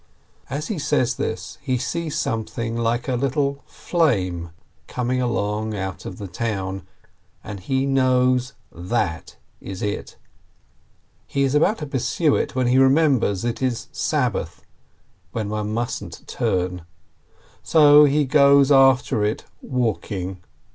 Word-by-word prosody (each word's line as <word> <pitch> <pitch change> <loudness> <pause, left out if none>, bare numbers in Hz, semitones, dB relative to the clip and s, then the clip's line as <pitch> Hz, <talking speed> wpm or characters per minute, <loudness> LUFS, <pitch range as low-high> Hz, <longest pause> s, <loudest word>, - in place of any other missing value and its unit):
As 145 +3 -4
he 205 -7 -2
says 125 -3 +1
this, 110 - -4
he 130 -2 -1
sees 150 +6 -3
something 115 +1 -2
like 115 +2 -1
a 130 - 0
little 140 +2 -1
flame 95 - 0 0.4
coming 125 +1 -1
along 110 -2 -1
out 95 -1 -5
of 90 - -7
the 100 - -6
town, 95 -1 -4 0.6
and 100 -1 -7
he 130 +7 -1
knows, 130 -1 +2 0.2
That 85 -3 -3 0.2
is 95 -1 -7
it! 105 -1 -4 1.1
He 140 - 0
is 135 0 +1
about 160 +9 +3
to 150 - -5
pursue 140 +3 +1
it, - - -2
when 130 -1 +1
he 125 +2 +3
remembers 135 - +3
it 120 +1 -2
is 125 -3 -2
Sab - - 0
bath, - - -6 0.7
when 110 -3 -3
one 105 0 -3
mustn't 120 +2 -4
turn. 90 0 -1 0.8
So 150 -2 +7
he 145 +1 +2
goes 140 0 +5
after 135 -5 +4
it 105 +1 -1 0.2
walk 120 -5 -2
ing. 95 -1 -4
125 Hz, 135 wpm, -22 LUFS, 105-140 Hz, 1.1 s, So